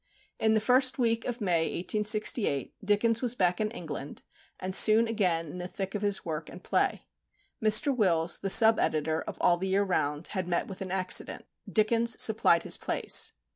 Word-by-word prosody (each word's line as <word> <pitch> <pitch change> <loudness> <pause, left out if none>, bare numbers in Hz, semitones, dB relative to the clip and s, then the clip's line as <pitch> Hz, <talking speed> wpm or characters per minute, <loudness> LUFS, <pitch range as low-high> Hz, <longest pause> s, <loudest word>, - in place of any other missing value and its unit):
In 220 0 +2
the - - +3
first 255 +4 +2
week 230 -2 -1
of 245 0 -5
May, 170 -5 0
1868, 210 - 0
Dickens 215 +3 0
was 245 -1 0
back 180 -2 0
in 215 - -1
England, 160 -9 -8 0.4
and 185 0 -5
soon 220 +3 +5
again 185 -7 -1
in 155 +3 -10
the 180 - -6
thick 195 +1 -6
of 210 - -4
his 205 -1 -1
work 160 -1 -6
and - - -13
play. - - -1 0.6
Mr. 220 +6 +4
Wills, 170 -7 0
the 195 - -4
sub 225 +2 +6
editor 155 +1 -1
of - - -8
All 175 - +2
the 190 +2 -4
Year 195 +1 +1
Round, 150 -4 -3
had 185 -3 -4
met 175 -1 -2
with 190 - -10
an 190 - -5
accident. 185 0 0 0.3
Dickens 230 +2 +1
supplied 210 -6 +3
his - - 0
place. - - +1
200 Hz, 185 wpm, -27 LUFS, 175-220 Hz, 0.6 s, sub